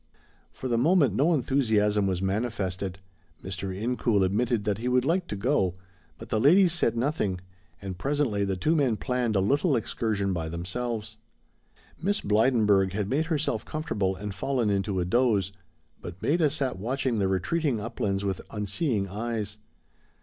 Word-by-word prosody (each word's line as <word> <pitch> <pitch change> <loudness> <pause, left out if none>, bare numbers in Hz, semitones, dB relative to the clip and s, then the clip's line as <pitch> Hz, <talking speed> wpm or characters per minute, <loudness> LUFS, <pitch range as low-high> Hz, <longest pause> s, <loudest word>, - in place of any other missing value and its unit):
For 130 - -6
the 120 -2 +1
moment 145 - +4
no 145 - +3
enthusiasm 110 -8 +2
was 95 -1 -1
manifested. 95 -3 -2 0.5
Mr. 95 0 -4
Incoul 110 0 0
admitted 110 +3 0
that 105 -1 -1
he 120 - -3
would 125 0 +2
like 175 +3 +1
to - - -4
go, 100 -5 +1 0.4
but - - -11
the 110 - +1
ladies 170 - +5
said 120 -9 +1
nothing, 115 - 0 0.4
and 95 -2 -7
presently 135 -7 0
the 100 -1 -1
two 155 - +1
men 130 -8 +2
planned 125 -3 -1
a - - +4
little 140 - +2
excursion 105 -4 -1
by 80 -2 -3
themselves. 110 +5 -4 0.8
Miss 200 +4 +1
Blydenburg 105 -3 +3
had 105 +1 -2
made 150 +4 +1
herself 155 -3 -1
comfortable 105 -12 -2
and 100 +1 -6
fallen 120 +1 0
into 100 -1 0
a 90 - 0
doze, 105 -2 +2 0.5
but 85 +1 -8
Maida 155 - +2
sat 135 -8 -2
watching 125 +1 -1
the 95 - +2
retreating 120 - 0
uplands 100 -3 -2
with 95 -2 -2
unseeing 105 - -1
eyes. 105 0 -4
110 Hz, 155 wpm, -27 LUFS, 100-135 Hz, 0.8 s, ladies